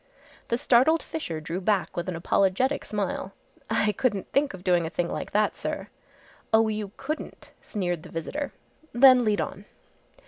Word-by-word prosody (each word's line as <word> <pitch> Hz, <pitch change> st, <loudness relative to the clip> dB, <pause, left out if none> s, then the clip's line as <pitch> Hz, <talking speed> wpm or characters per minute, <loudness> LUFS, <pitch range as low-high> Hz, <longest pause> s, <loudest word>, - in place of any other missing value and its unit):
The 235 Hz, -, +1 dB
startled 265 Hz, +7 st, +4 dB
Fisher 170 Hz, -, -4 dB
drew 165 Hz, +4 st, -4 dB
back 195 Hz, -1 st, 0 dB
with 175 Hz, +1 st, -2 dB
an 180 Hz, -, -3 dB
apologetic 200 Hz, +10 st, +1 dB
smile. 195 Hz, -1 st, -3 dB, 0.4 s
"I 220 Hz, -1 st, +2 dB
couldn't 210 Hz, -4 st, -1 dB
think 275 Hz, -6 st, +1 dB
of 180 Hz, -, -13 dB
doing 175 Hz, -3 st, +2 dB
a -, -, -4 dB
thing 175 Hz, 0 st, -2 dB
like -, -, -4 dB
that, 210 Hz, 0 st, +1 dB
sir." -, -, -4 dB, 0.6 s
"Oh, 220 Hz, 0 st, +5 dB
you 210 Hz, -2 st, -3 dB
couldn't," 305 Hz, +4 st, -6 dB
sneered 175 Hz, -6 st, -2 dB
the -, -, -12 dB
visitor; 280 Hz, -, -4 dB, 0.4 s
"then 255 Hz, 0 st, +8 dB
lead 210 Hz, -5 st, +2 dB
on!" 195 Hz, +5 st, -5 dB
210 Hz, 165 wpm, -26 LUFS, 180-245 Hz, 0.6 s, then